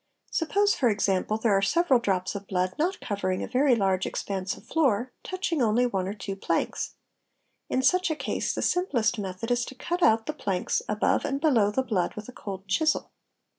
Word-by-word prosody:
Suppose, 405 +5 +2
for 245 - +2
example, 200 0 +1
there 220 -2 +2
are 195 - +3
several 270 - +3
drops 190 -5 -1
of 200 -1 -7
blood 185 -1 0
not 360 +5 0
covering 185 -4 -2
a - - -4
very 260 0 +3
large 190 -3 +1
expanse 195 -1 -3
of - - -16
floor, 255 -5 +1
touching 370 -5 -2
only 235 +2 +3
one 195 -6 -1
or 200 - -4
two 195 -1 -5
planks; 195 - -2 0.7
in 260 - 0
such 365 +4 +3
a 315 - 0
case - - -2
the - - -2
simplest 245 - +1
method 195 +4 -4
is 245 0 +2
to 265 - -9
cut 350 +7 -3
out 225 -6 +4
the 305 - -3
planks 195 -10 -1
above 210 +1 +1
and 275 0 -1
below 255 -10 +3
the 260 +6 0
blood 200 -8 -1
with 210 0 -7
a - - -8
cold 195 -3 -7
chisel. 310 +11 +1
220 Hz, 200 wpm, -27 LUFS, 195-280 Hz, 0.7 s, out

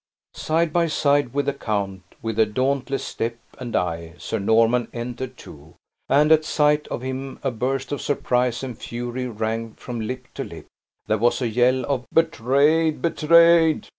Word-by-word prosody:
Side 160 0 0
by 170 -1 +2
side 145 -4 +2
with 140 +2 -1
the 140 - 0
count, 100 -7 -3 0.2
with 115 -1 -3
a 110 - +6
dauntless 135 +4 -1
step 115 +1 -3 0.2
and 120 -2 -5
eye, 85 -1 -2
Sir 110 - -3
Norman 115 +4 +3
entered, 125 +1 -5
too; 75 +2 -14 0.3
and, 150 +2 +4
at 155 0 +6
sight 150 -1 +2
of 120 - -5
him 130 +1 -5
a 135 - 0
burst 130 +4 -2
of 145 - -3
surprise 125 -3 0
and 125 -3 -5
fury 120 +2 -5
rang 115 0 -3
from 120 -2 -6
lip 125 +3 -5
to - - -4
lip. - - -10 0.4
There 110 - 0
was 120 +2 +2
a 125 - 0
yell 125 +2 +2
of 135 -3 -2
"Betrayed, 155 +1 +2
betrayed!" 170 0 +4
130 Hz, 165 wpm, -23 LUFS, 115-145 Hz, 0.4 s, a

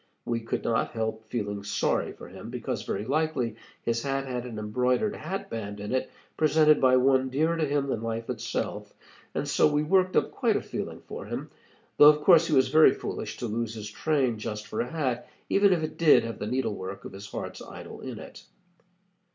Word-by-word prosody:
We 115 -1 -1
could 115 - -3
not 115 -1 0
help 110 -1 -3
feeling 105 -4 -3
sorry 100 - 0
for - - -11
him, - - -10
because - - -3
very 100 +2 -3
likely 140 -4 0 0.3
his 115 0 0
hat 135 +1 -1
had 125 -2 -4
an 115 -3 -7
embroidered 125 - 0
hat 185 +6 -5
band 105 -2 -5
in 105 +1 -5
it, 130 0 0 0.3
presented 155 0 +4
by 130 -1 +6
one 130 0 +3
dearer 155 +6 +1
to 160 -2 0
him 140 0 +1
than 130 -5 -2
life 115 0 -3
itself, 120 -1 -3 0.4
and - - -1
so 150 - +3
we 150 0 +2
worked 185 +3 +2
up - - +2
quite - - +1
a - - +1
feeling - - -5
for - - -8
him, - - -5 0.5
though 145 - +10
of 150 0 +3
course 170 -1 +6
he 155 - +2
was 130 -1 +4
very 155 +3 +6
foolish - - -5
to - - -4
lose 115 0 -2
his 105 -1 -6
train 130 -5 0
just 105 -1 -5
for 110 - -3
a 120 - -3
hat, 130 -7 -2 0.2
even 200 0 +5
if 170 -3 +2
it 155 - -5
did 165 -3 +6
have 115 -2 -5
the 105 - -3
needle 130 -2 0
work 95 0 -7
of - - -7
his 100 +2 -9
heart's - - -6
idol - - -10
in - - -6
it. - - -11
125 Hz, 210 wpm, -27 LUFS, 110-150 Hz, 0.5 s, though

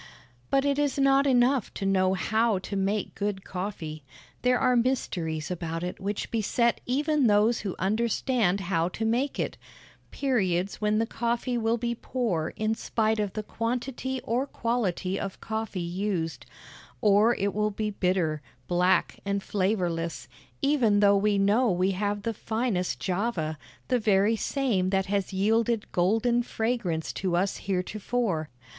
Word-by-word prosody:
But 275 0 +2
it 280 0 +1
is 290 -1 +1
not 275 0 +4
enough 255 -1 +3
to 195 - -3
know 190 -1 +3
how 220 +4 +1
to 185 +2 -5
make 195 +1 -1
good 200 -1 -3
coffee. 175 -5 -5 0.4
There 250 0 +3
are 250 - +3
mysteries 180 - -1
about 165 -1 -3
it 180 - -4
which 200 +1 -3
beset 235 +1 +1
even 290 +1 +2
those 215 +2 +4
who 195 -3 -4
understand 215 0 +1
how 170 -2 0
to 225 - -1
make 245 +6 0
it - - -2 0.5
periods 200 -10 0
when 210 0 +2
the 225 - +2
coffee 235 +2 -1
will 230 0 +1
be 235 0 -1
poor 225 -10 -2
in 215 0 0
spite 220 -1 0
of 205 -2 -1
the 215 - -3
quantity 250 +4 -3
or 250 +5 0
quality 195 -7 -1
of 195 -1 -5
coffee 220 -3 -4
used, 175 -3 -3 0.5
or 210 - +4
it 200 0 -1
will 210 +1 +1
be 210 +1 -3
bitter, 180 -6 0 0.3
black, 180 +1 +2
and 200 0 -1
flavorless, 180 -5 -1 0.4
even 250 -8 +3
though 200 0 +6
we 205 +1 +2
know 210 +5 +3
we 185 +1 +2
have 205 +1 -2
the 230 - -1
finest 220 -4 -1
Java, 180 -6 -2 0.3
the 250 -2 +2
very 210 0 +3
same 220 -7 0
that 190 0 +1
has 200 -1 -1
yielded 220 +3 +1
golden 225 +7 +2
fragrance 220 -9 -2
to 185 -2 -1
us 190 +3 +1
heretofore. 195 -2 -2
210 Hz, 150 wpm, -27 LUFS, 185-235 Hz, 0.5 s, though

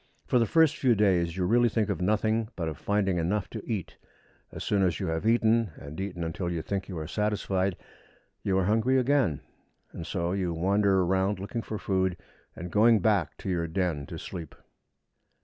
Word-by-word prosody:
For 125 - +2
the 115 - +2
first 160 -3 +4
few 125 -4 +3
days 90 -4 +2
you 90 - 0
really 120 +5 +4
think 110 -2 0
of - - -2
nothing 110 +3 +1
but 85 -3 -3
of 80 -3 -5
finding 95 -3 0
enough 95 +4 -1
to 110 - -5
eat. 100 -6 -4 0.5
As - - -6
soon 100 -1 +1
as 90 -3 +1
you 95 - -2
have 80 +6 -1
eaten, 115 -1 +3
and 75 +6 -8
eaten 90 -3 -4
until 85 +2 -3
you 85 -2 -3
think 100 0 -3
you 90 - -5
are 80 - -4
satisfied, 100 -1 -1 0.6
you 95 -1 0
are 95 - +2
hungry 115 +6 +2
again; 130 - +2 0.5
and 85 - -7
so 85 -3 -1
you 90 -3 -1
wander 95 +2 +2
round 95 +2 +1
looking 100 +5 -4
for 110 - -5
food, 95 -3 0 0.4
and 90 +1 -7
going 115 +4 +5
back 100 -6 +1
to - - -6
your 85 -2 0
den 80 -5 -2
to - - -7
sleep. 85 -3 -8
95 Hz, 195 wpm, -28 LUFS, 90-110 Hz, 0.6 s, going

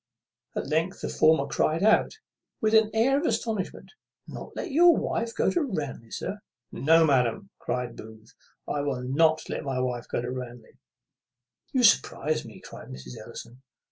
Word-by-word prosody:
At - - -2
length 160 +6 -1
the - - -3
former 155 -2 +4
cried 155 +4 0
out 220 - +3 0.4
with 220 0 +1
an 220 -1 +5
air 255 +6 +3
of 315 - -3
astonishment, 215 -5 -3 0.4
"Not - - -9
let - - -4
your 340 +3 +6
lady 230 0 -2
go - - +2
to 350 - +1
Ranelagh, 150 - -4
sir?" 205 - -4 0.3
"No, 165 +3 +4
madam," 140 - +1
cries 125 -1 -3
Booth, 110 0 -13 0.3
"I 145 - -1
will 135 -3 -2
not 155 +5 +2
let - - -4
my 135 -2 -2
wife 125 -1 -2
go - - -2
to 120 +1 -4
Ranelagh." 125 -2 -8 0.9
"You 255 -2 +1
surprize 155 -7 +3
me!" 110 -3 -11
cries - - -11
Mrs. 65 -1 -9
Ellison. 125 +3 -11
155 Hz, 165 wpm, -27 LUFS, -, 0.9 s, your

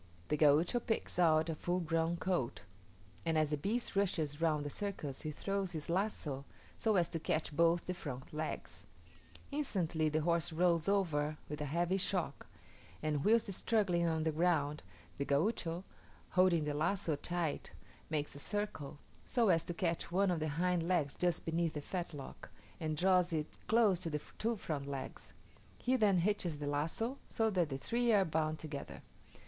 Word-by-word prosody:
The 150 - +3
Gaucho 155 - +4
picks 225 -5 -2
out 160 -2 +5
a 165 - -1
full 175 +3 -1
grown 165 0 0
colt; 175 -9 -1 0.6
and 165 -1 +1
as 155 -1 +2
the - - +3
beast 215 +11 -1
rushes 160 -6 0
round 155 -3 +2
the 145 - -3
circus 170 -9 -4
he 155 - -3
throws 195 +4 -2
his 160 +1 -4
lazo 170 -8 -1 0.3
so 220 -2 +1
as 175 -3 +4
to 165 - -3
catch 155 -1 -1
both 170 +2 +3
the 180 - -2
front 135 -7 -7
legs. 155 +1 -5 0.6
Instantly 175 - 0
the 155 +1 +1
horse 170 +1 +1
rolls 170 +1 +2
over 155 -7 +1
with 150 +1 -5
a - - -1
heavy 170 +6 +1
shock, 180 -6 -1 0.6
and 150 -2 0
whilst 220 -2 +3
struggling 180 -5 +2
on 160 -1 +1
the 160 - +1
ground, 155 -2 +1 0.4
the - - +2
Gaucho, 165 +3 0 0.5
holding 180 -3 +4
the 150 0 -1
lazo 165 +1 0
tight, 170 +1 -2 0.4
makes 150 -2 -1
a 140 - -9
circle, 155 -6 -3 0.3
so 235 -5 +2
as 165 -3 +4
to 175 - -3
catch 170 -1 -1
one 190 +1 +3
of 170 - 0
the 155 - -1
hind 175 +3 +1
legs 165 -6 +1
just 175 -1 0
beneath 165 0 0
the 150 - -3
fetlock, 165 -4 -6 0.3
and 155 -2 -2
draws 180 0 +4
it 155 -2 -2
close 220 -6 +4
to 175 -2 -3
the 150 -1 -1 0.2
two 230 +2 +1
front 150 -8 -4
legs: 135 -2 -6 0.4
he 255 +1 +1
then 210 -6 +4
hitches 175 -3 +1
the 145 - -4
lazo, 165 - -1
so 225 -1 +1
that 175 -5 +1
the 135 - -2
three 235 - +1
are 200 -3 +5
bound 155 -1 0
together. 155 -3 -7
165 Hz, 175 wpm, -35 LUFS, 150-185 Hz, 0.6 s, out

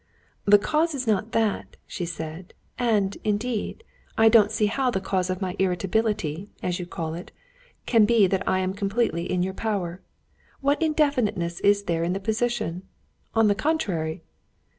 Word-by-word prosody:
"The 205 0 +8
cause 310 +9 0
is 255 -2 -3
not 215 0 0
that," 225 -2 0
she 175 - -4
said, 160 +2 -7 0.2
"and, 210 -5 +1
indeed, 215 - -2 0.3
I 225 0 +6
don't 215 -2 +6
see 215 - +1
how 255 +5 +1
the 195 - 0
cause 185 -1 -1
of 185 +1 -2
my 185 -1 -3
irritability, 190 -1 0
as 180 0 -1
you 175 - -5
call 165 -3 -4
it, 175 +3 -8 0.5
can 225 -3 +5
be 225 -2 +5
that 190 0 0
I 185 0 +2
am 185 0 -1
completely 200 -3 -1
in 180 -1 +1
your 190 +1 -2
power. 190 -4 -3 0.6
What 285 +3 +1
indefiniteness 255 - +1
is 200 0 +3
there 165 -3 -1
in 175 +2 0
the 195 - -2
position? 220 -3 -1 0.5
on 225 -1 +5
the 205 - +4
contrary...." 200 - -1
200 Hz, 165 wpm, -25 LUFS, 180-225 Hz, 0.6 s, The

